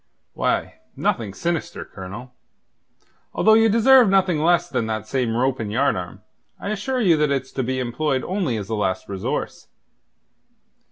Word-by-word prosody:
"Why, -, -, -1 dB, 0.2 s
nothing 110 Hz, -4 st, -1 dB
sinister, 170 Hz, -, -3 dB
Colonel. 105 Hz, +7 st, -9 dB, 1.0 s
Although 220 Hz, -, +5 dB
ye 225 Hz, 0 st, +5 dB
deserve 230 Hz, +1 st, +6 dB
nothing 190 Hz, -4 st, +2 dB
less 170 Hz, +3 st, +3 dB
than 110 Hz, -, -2 dB
that 110 Hz, -1 st, -3 dB
same 115 Hz, 0 st, -1 dB
rope 130 Hz, +1 st, 0 dB
and 105 Hz, -2 st, -4 dB
yardarm, 105 Hz, -8 st, -1 dB, 0.4 s
I -, -, -5 dB
assure 235 Hz, +5 st, -2 dB
you 180 Hz, -7 st, +4 dB
that 150 Hz, -1 st, +2 dB
it's 135 Hz, -2 st, -2 dB
to 130 Hz, -, -2 dB
be 130 Hz, +1 st, -2 dB
employed 130 Hz, +2 st, -1 dB
only 180 Hz, -, -1 dB
as 100 Hz, -2 st, -5 dB
a -, -, -2 dB
last 95 Hz, -3 st, -1 dB
resource. 95 Hz, -1 st, -4 dB
130 Hz, 155 wpm, -22 LUFS, 110-185 Hz, 1.0 s, deserve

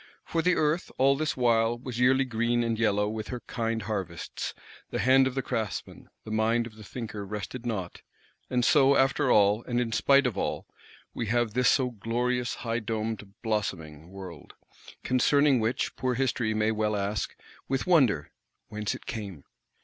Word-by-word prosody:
For 165 Hz, -, 0 dB
the 180 Hz, +2 st, +3 dB
Earth, 155 Hz, +3 st, 0 dB
all 135 Hz, +1 st, +4 dB
this 155 Hz, 0 st, -2 dB
while, 115 Hz, -1 st, +2 dB
was 120 Hz, -1 st, -6 dB
yearly 130 Hz, +2 st, +4 dB
green 120 Hz, 0 st, 0 dB
and 115 Hz, -1 st, -1 dB
yellow 105 Hz, -2 st, +2 dB
with 110 Hz, 0 st, -4 dB
her 125 Hz, -2 st, -5 dB
kind 115 Hz, -2 st, -3 dB
harvests; 95 Hz, -6 st, -4 dB, 0.3 s
the -, -, -3 dB
hand 130 Hz, +1 st, +5 dB
of 130 Hz, -, -4 dB
the 135 Hz, -, -1 dB
craftsman, 110 Hz, -4 st, -4 dB
the 110 Hz, -, -8 dB
mind 115 Hz, +2 st, +2 dB
of 110 Hz, -2 st, -10 dB
the 110 Hz, -, -12 dB
thinker 110 Hz, -2 st, -6 dB
rested 105 Hz, +4 st, -6 dB
not: 95 Hz, -6 st, -4 dB, 0.5 s
and 125 Hz, -1 st, +1 dB
so, 140 Hz, 0 st, +5 dB
after 135 Hz, +1 st, +2 dB
all, 105 Hz, 0 st, +4 dB
and 120 Hz, -1 st, 0 dB
in 120 Hz, -2 st, -1 dB
spite 140 Hz, +4 st, +4 dB
of 120 Hz, -5 st, 0 dB
all, -, -, -2 dB, 0.5 s
we 115 Hz, -, -3 dB
have 120 Hz, -1 st, +1 dB
this 125 Hz, +1 st, +3 dB
so 130 Hz, -3 st, +2 dB
glorious 120 Hz, +3 st, -1 dB
high 115 Hz, 0 st, 0 dB
domed 110 Hz, -2 st, -4 dB
blossoming 85 Hz, -8 st, -3 dB
World; 95 Hz, -2 st, -10 dB, 0.5 s
concerning 140 Hz, +1 st, +3 dB
which, 115 Hz, +3 st, -1 dB
poor 125 Hz, -1 st, -1 dB
History 120 Hz, -3 st, 0 dB
may 110 Hz, +1 st, +2 dB
well 105 Hz, -1 st, 0 dB
ask, 100 Hz, 0 st, -2 dB, 0.3 s
with 135 Hz, 0 st, -1 dB
wonder, 130 Hz, -, +3 dB, 0.4 s
Whence 105 Hz, -1 st, -3 dB
it -, -, -12 dB
came? 100 Hz, -10 st, -6 dB
115 Hz, 170 wpm, -28 LUFS, 105-125 Hz, 0.5 s, hand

